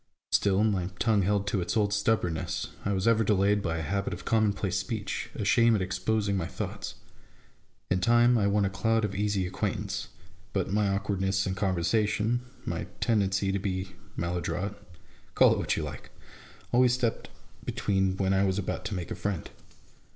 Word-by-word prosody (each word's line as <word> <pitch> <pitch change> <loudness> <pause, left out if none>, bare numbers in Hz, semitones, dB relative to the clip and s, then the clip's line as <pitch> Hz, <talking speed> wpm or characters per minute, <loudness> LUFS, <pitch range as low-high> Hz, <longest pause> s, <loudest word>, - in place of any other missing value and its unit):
Still, 100 0 +3
my 100 -5 +1
tongue 110 -1 +3
held 100 +1 +1
to 100 -2 0
its 90 - -1
old 105 -1 +2
stubbornness: 105 -6 0
I 100 - 0
was 95 +1 0
ever 115 -1 +4
delayed 105 0 +3
by 85 -3 -1
a - - -2
habit 100 +6 -1
of - - -12
commonplace 100 -3 +1
speech, 110 0 -3
a 105 - -3
shame 115 +2 +5
at 100 - 0
exposing 100 +3 0
my 90 -4 -1
thoughts. - - -5 1.0
In 95 - +3
time 120 +5 +5
I 105 -4 +3
won 100 0 +2
a - - +1
cloud 115 +3 +1
of 100 - -3
easy 100 -1 0
acquaintance; 90 - -3 0.5
but 95 0 -1
my 105 -1 +2
awkwardness 95 -1 0
in 95 - -1
conversa 95 +3 +1
tion, 110 +3 0 0.2
my - - -3
tendency 100 -3 +1
to 100 - 0
be 95 -1 -2 0.3
maladroit, 90 +3 -2 0.3
— - - -30
call - - +6
it - - -2
what - - 0
you - - -1
like! - - -7 0.6
always 125 0 +5
stepped 120 -3 -1 0.3
between 95 -1 0
when 95 -1 +1
I 95 0 +3
was 95 -1 +1
about 100 - -3
to 105 - -3
make 90 -2 -5
a - - -2
friend. 100 -5 -3
100 Hz, 180 wpm, -28 LUFS, 95-105 Hz, 1.0 s, call